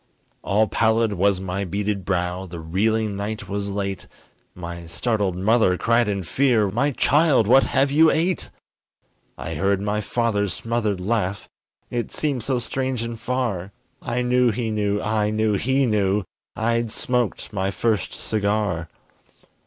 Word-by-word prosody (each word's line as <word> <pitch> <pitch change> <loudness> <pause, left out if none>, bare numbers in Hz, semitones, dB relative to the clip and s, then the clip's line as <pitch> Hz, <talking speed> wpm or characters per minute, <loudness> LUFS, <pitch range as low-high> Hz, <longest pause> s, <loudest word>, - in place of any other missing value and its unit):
All 105 +2 +2
pallid 110 -1 +2
was 100 0 +2
my 95 +1 -3
beaded 100 +1 -2
brow, 90 0 -1
The 85 -1 -8
reeling 105 +6 0
night 105 +2 -4
was 100 0 -3
late, 100 -1 -3 0.5
My 85 -1 -7
startled 100 +1 -1
mother 100 -1 +3
cried 115 +2 +2
in 100 -2 -1
fear, 115 -1 +2
"My 130 +8 +1
child, 145 -2 +3
what 130 +5 +6
have 135 +1 +1
you 160 +2 +6
ate?" 175 +3 0 0.9
I 80 - -5
heard 95 +5 +1
my 105 +1 -1
father's 105 -4 0
smothered 115 -4 -1
laugh, 100 0 -1 0.4
It 120 -1 -2
seemed 145 -5 -1
so 130 +1 0
strange 130 0 -2
and 115 -1 -5
far, 110 -8 -2 0.3
I 120 +1 -1
knew 125 0 +3
he 115 0 -2
knew 105 -1 0
I 105 0 0
knew 110 0 +1
he 130 +7 +2
knew 105 -3 +1 0.3
I'd 115 +1 0
smoked 120 -1 -1
my 95 -1 0
first 100 -1 0
cigar! 100 -6 -1
105 Hz, 145 wpm, -23 LUFS, 100-120 Hz, 0.9 s, what